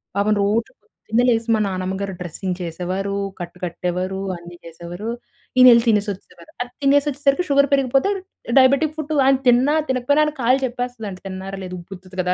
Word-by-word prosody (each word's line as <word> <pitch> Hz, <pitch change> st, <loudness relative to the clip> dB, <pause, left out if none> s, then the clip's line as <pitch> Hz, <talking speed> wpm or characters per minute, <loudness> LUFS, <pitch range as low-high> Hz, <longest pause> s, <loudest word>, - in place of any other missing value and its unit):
పాపం 205 Hz, +2 st, +2 dB
రోజు 225 Hz, +5 st, 0 dB
పొద్దున్నే 230 Hz, +3 st, -2 dB
లేసి 230 Hz, 0 st, +1 dB
మా 220 Hz, -, 0 dB
నానమ్మ 185 Hz, 0 st, -3 dB
గారు 195 Hz, -1 st, -3 dB
డ్రెస్సింగ్ 180 Hz, +1 st, -4 dB
చేసేవారు. 185 Hz, +4 st, -3 dB, 0.2 s
కట్టు 175 Hz, +1 st, -7 dB
కట్టేవారు. 180 Hz, +2 st, -3 dB, 0.2 s
అన్ని 175 Hz, 0 st, -12 dB
చేసేవారు. 170 Hz, +6 st, -7 dB, 0.5 s
ఈయనెళ్లి 240 Hz, -2 st, +8 dB
తినేసొచ్చేసేవారు. 200 Hz, -5 st, -2 dB
అది 245 Hz, 0 st, -5 dB
తినేసొచ్చేసరికి 285 Hz, +3 st, +2 dB
షుగర్ 280 Hz, 0 st, +4 dB
పెరిగిపోతే 270 Hz, +6 st, +2 dB, 0.5 s
డయాబెటిక్ 280 Hz, +4 st, +3 dB
ఫుట్ 310 Hz, 0 st, -3 dB
ఆయన 270 Hz, 0 st, +5 dB
తిన్నా, 250 Hz, +5 st, +4 dB
తినకపోయినా, 260 Hz, +4 st, +2 dB
ఆయన 300 Hz, -, -2 dB
కాళ్ళు 255 Hz, +3 st, +3 dB
చెప్పేస్తదండి 240 Hz, -6 st, -5 dB
తిన్నారా? 190 Hz, +1 st, -6 dB
లేదా? 185 Hz, 0 st, -6 dB
ఉబ్బుతది 185 Hz, 0 st, -12 dB
కదా! 180 Hz, 0 st, 0 dB
215 Hz, 150 wpm, -21 LUFS, 185-260 Hz, 0.5 s, ఈయనెళ్లి